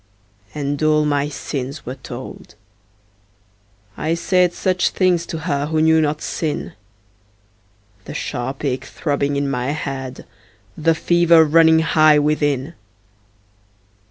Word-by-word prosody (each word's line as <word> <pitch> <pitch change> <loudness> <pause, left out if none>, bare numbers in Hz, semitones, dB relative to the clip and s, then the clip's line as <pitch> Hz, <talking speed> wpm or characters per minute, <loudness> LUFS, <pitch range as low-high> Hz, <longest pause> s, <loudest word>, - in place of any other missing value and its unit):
And 145 0 -3
all 155 0 +3
my 145 0 0
sins 140 0 -6
were 125 - -5
told; 130 -4 -10 1.4
I 160 +2 -1
said 180 +1 +2
Such 185 +1 0
things 180 -3 +1
to 160 - -4
her 145 -3 -1
who 160 0 0
knew 160 0 +4
not 150 0 -1
sin 155 -3 -3 1.3
The - - -8
sharp 130 +4 -4
ache 130 -1 -2
throbbing 145 0 -2
in 140 0 -1
my 125 -2 -2
head, 135 -4 -6 0.5
The 160 +1 +1
fever 170 -1 +4
running 160 +1 +5
high 155 -1 +4
within. 145 0 0
150 Hz, 120 wpm, -19 LUFS, 140-160 Hz, 1.4 s, running